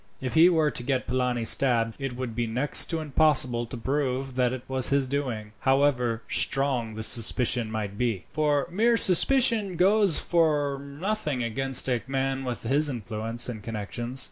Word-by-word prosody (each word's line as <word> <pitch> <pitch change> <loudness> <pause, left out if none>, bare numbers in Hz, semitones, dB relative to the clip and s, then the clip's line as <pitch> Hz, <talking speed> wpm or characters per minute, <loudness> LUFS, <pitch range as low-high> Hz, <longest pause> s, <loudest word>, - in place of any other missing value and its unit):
If 130 -1 -5
he 165 +2 +6
were 160 -4 +1
to - - -3
get 130 +1 -2
Polani 125 -1 -2
stabbed, 115 -2 +3
it 135 -3 -5
would 125 -2 -5
be 120 +1 -2
next 125 +6 +1
to 165 -2 -3
impossible 135 -5 +3
to 120 - -8
prove 135 +1 -3
that 125 -1 0
it 130 -1 -6
was 130 -1 +1
his 140 -1 +1
doing, 125 -6 -4
however 130 -4 0
strong 130 -5 0
the 110 - -5
suspicion 120 +1 +2
might 105 -2 -5
be; 115 -7 -2
for 150 -2 0
mere 230 +5 +2
suspicion 225 -1 +2
goes 195 0 +3
for 150 -5 0
nothing 145 - -4
against 135 +4 +1
a 125 -3 -1
man 135 0 -2
with 125 -2 -4
his 145 +6 +1
influence 115 -1 -3
and 115 -4 -7
connections. 115 +4 -5
130 Hz, 170 wpm, -25 LUFS, 120-145 Hz, -, he